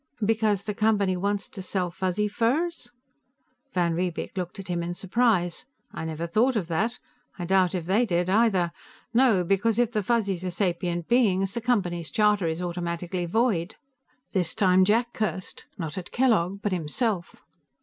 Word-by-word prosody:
"Because 215 Hz, -2 st, +1 dB
the 210 Hz, 0 st, -3 dB
Company 205 Hz, -3 st, +2 dB
wants 200 Hz, +2 st, -1 dB
to 195 Hz, -, -8 dB
sell 185 Hz, -1 st, -2 dB
Fuzzy 185 Hz, +3 st, -1 dB
furs?" 250 Hz, +7 st, -1 dB, 0.8 s
Van 175 Hz, -4 st, +1 dB
Riebeek 175 Hz, +2 st, -3 dB
looked 180 Hz, 0 st, -4 dB
at 195 Hz, 0 st, -8 dB
him 175 Hz, -1 st, -1 dB
in 175 Hz, +1 st, -4 dB
surprise. 195 Hz, -1 st, +1 dB, 0.3 s
"I -, -, -5 dB
never 160 Hz, +1 st, -3 dB
thought 230 Hz, +9 st, +2 dB
of 195 Hz, -7 st, -1 dB
that. 220 Hz, +9 st, 0 dB, 0.4 s
I 175 Hz, -, -4 dB
doubt 185 Hz, 0 st, +3 dB
if 175 Hz, -3 st, -3 dB
they 210 Hz, +7 st, +2 dB
did, 175 Hz, -2 st, +1 dB
either. 190 Hz, -4 st, +3 dB, 0.4 s
No. 230 Hz, -7 st, +4 dB
Because 200 Hz, +5 st, +1 dB
if 240 Hz, -1 st, +2 dB
the 215 Hz, -3 st, 0 dB
Fuzzies 200 Hz, -4 st, 0 dB
are 185 Hz, -, -1 dB
sapient 175 Hz, -2 st, -1 dB
beings, 195 Hz, -6 st, +2 dB
the 235 Hz, -, -3 dB
Company's 180 Hz, -9 st, 0 dB
charter 210 Hz, -4 st, +2 dB
is 160 Hz, +2 st, -2 dB
automatically 175 Hz, 0 st, -3 dB
void." 210 Hz, -2 st, +1 dB, 0.6 s
This 180 Hz, -5 st, 0 dB
time 185 Hz, -1 st, +4 dB
Jack 235 Hz, +4 st, +2 dB
cursed, 190 Hz, -4 st, -3 dB
not 170 Hz, +1 st, -5 dB
Kellogg 205 Hz, -6 st, +1 dB
but 205 Hz, -, 0 dB
himself. 180 Hz, +3 st, -1 dB
190 Hz, 160 wpm, -26 LUFS, 175-220 Hz, 0.8 s, No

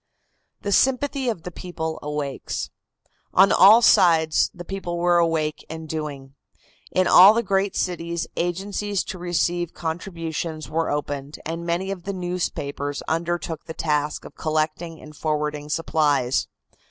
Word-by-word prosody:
THE 200 Hz, -, -2 dB
SYMPATHY 265 Hz, +4 st, +2 dB
OF 180 Hz, -8 st, -4 dB
THE 180 Hz, -, -6 dB
PEOPLE 160 Hz, -3 st, -5 dB
AWAKES. 150 Hz, -2 st, -4 dB, 0.6 s
On 195 Hz, +2 st, +6 dB
all 210 Hz, +6 st, +7 dB
sides 165 Hz, -6 st, +5 dB
the 175 Hz, 0 st, -10 dB
people 185 Hz, -2 st, -4 dB
were 175 Hz, 0 st, +3 dB
awake 160 Hz, -2 st, 0 dB
and 160 Hz, 0 st, -7 dB
doing. 145 Hz, -4 st, -5 dB, 0.6 s
In 185 Hz, -, +2 dB
all 195 Hz, +5 st, +8 dB
the 235 Hz, -, +1 dB
great 195 Hz, 0 st, 0 dB
cities 170 Hz, -2 st, -2 dB
agencies 195 Hz, +3 st, -2 dB
to 185 Hz, -, -7 dB
receive 175 Hz, 0 st, -1 dB
contributions 165 Hz, -2 st, -4 dB
were 165 Hz, +1 st, 0 dB
opened, 145 Hz, 0 st, -3 dB
and 165 Hz, +1 st, -4 dB
many 180 Hz, +3 st, -1 dB
of 185 Hz, -3 st, -6 dB
the 200 Hz, -, -3 dB
newspapers 155 Hz, -6 st, -3 dB
undertook 165 Hz, -1 st, -2 dB
the 160 Hz, -, -7 dB
task 150 Hz, -1 st, -1 dB
of -, -, -10 dB
collecting 155 Hz, +1 st, -2 dB
and 150 Hz, 0 st, -12 dB
forwarding 150 Hz, -1 st, -2 dB
supplies. 150 Hz, -5 st, +1 dB
165 Hz, 140 wpm, -23 LUFS, 155-180 Hz, 0.6 s, all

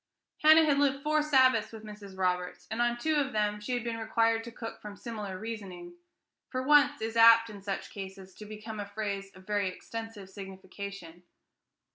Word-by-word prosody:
Hannah 315 Hz, +1 st, +8 dB
had 285 Hz, -2 st, +3 dB
lived 275 Hz, -1 st, +1 dB
four 305 Hz, 0 st, +2 dB
Sabbaths 260 Hz, -7 st, +4 dB
with 220 Hz, -1 st, -10 dB
Mrs. 210 Hz, -3 st, -10 dB
Roberts, 180 Hz, -1 st, -1 dB
and 225 Hz, +2 st, -1 dB
on 240 Hz, 0 st, +1 dB
two 310 Hz, +5 st, 0 dB
of 275 Hz, -2 st, 0 dB
them 210 Hz, -1 st, 0 dB
she 230 Hz, +4 st, -3 dB
had 245 Hz, -2 st, -1 dB
been 230 Hz, -1 st, -3 dB
required 225 Hz, 0 st, +1 dB
to 235 Hz, -, -7 dB
cook 225 Hz, -1 st, -8 dB
from 205 Hz, -1 st, -9 dB
similar 210 Hz, -5 st, -6 dB
reasoning. 190 Hz, -5 st, -7 dB, 0.6 s
"For 255 Hz, 0 st, -2 dB
once" 290 Hz, -2 st, +4 dB
is 225 Hz, +1 st, -3 dB
apt, 230 Hz, 0 st, +7 dB
in 200 Hz, -1 st, -10 dB
such 195 Hz, 0 st, -4 dB
cases, 190 Hz, -1 st, -9 dB
to 210 Hz, -, -11 dB
become 215 Hz, +1 st, -7 dB
a 205 Hz, -, -4 dB
phrase 200 Hz, -1 st, -4 dB
of 185 Hz, 0 st, -15 dB
very 205 Hz, -1 st, 0 dB
extensive 225 Hz, +1 st, -8 dB
signification. 190 Hz, -2 st, -9 dB
215 Hz, 185 wpm, -30 LUFS, 200-240 Hz, 0.6 s, Hannah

